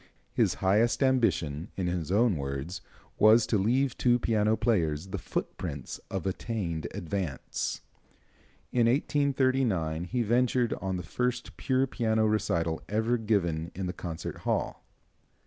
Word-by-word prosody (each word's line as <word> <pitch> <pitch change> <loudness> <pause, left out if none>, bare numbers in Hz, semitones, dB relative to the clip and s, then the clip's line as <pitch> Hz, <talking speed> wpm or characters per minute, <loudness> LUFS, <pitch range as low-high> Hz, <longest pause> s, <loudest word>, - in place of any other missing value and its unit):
His - - +2
highest 105 +8 +2
ambition, 90 - +1
in 95 - -1
his 85 -2 -2
own 110 0 +4
words, 70 +5 -4 0.4
was 110 +2 +7
"to 110 - +1
leave 125 +6 +2
to 120 -1 +4
piano 110 -2 +2
players 85 -7 0
the - - -3
foot - - -3
prints - - -5
of 95 -2 -3
attained 95 -5 -2
advance." 85 -5 -3 0.9
In 120 -2 +3
1839 130 - +1
he 120 +6 -1
ventured 120 +1 +2
on 95 -1 -2
the 90 - -5
first 125 +8 -2
pure 130 0 +1
piano 110 -4 +1
recital 85 -6 0
ever 110 +3 +1
given 85 -7 0
in 95 +1 -3
the 90 - -3
concert 85 -3 -6
hall. - - -2
105 Hz, 135 wpm, -29 LUFS, 85-120 Hz, 0.9 s, was